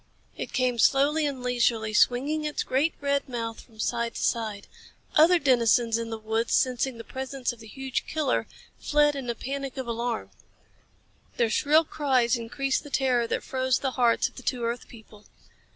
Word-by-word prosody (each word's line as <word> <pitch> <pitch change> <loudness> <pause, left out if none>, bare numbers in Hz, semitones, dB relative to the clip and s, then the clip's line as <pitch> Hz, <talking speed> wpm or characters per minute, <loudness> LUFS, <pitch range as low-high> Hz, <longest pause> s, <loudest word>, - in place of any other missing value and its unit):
It - - -6
came 250 -2 0
slowly 290 +5 +3
and 265 -3 -5
leisurely, 235 -3 +1
swinging 275 +8 +2
its 300 -1 -2
great 285 +6 +1
red 280 -1 0
mouth 230 -2 -4
from 220 -3 -21
side 235 0 -1
to - - -3
side. 215 -4 -1 0.5
Other 335 +4 +6
denizens 235 -5 +3
in 230 0 -4
the 225 - -4
woods, 220 +1 0
sensing 255 -1 +1
the 230 - -8
presence 265 0 -4
of 235 - -16
the 220 - -12
huge 265 +3 -4
killer, 300 -4 0 0.3
fled 295 0 +3
in 265 -3 -5
a 235 - -1
panic 275 +2 -5
of 260 - -3
alarm. 235 0 -3 1.1
Their 230 -2 +2
shrill 305 +7 +4
cries 260 -6 +1
increased 260 +4 -1
the 290 - -10
terror 255 -3 +1
that - - -2
froze 260 -1 0
the 265 - -2
hearts 240 -3 +2
of - - -16
the - - -7
two 250 -1 -2
earth 235 +1 -3
people. 215 -2 -16
250 Hz, 180 wpm, -26 LUFS, 230-275 Hz, 1.1 s, Other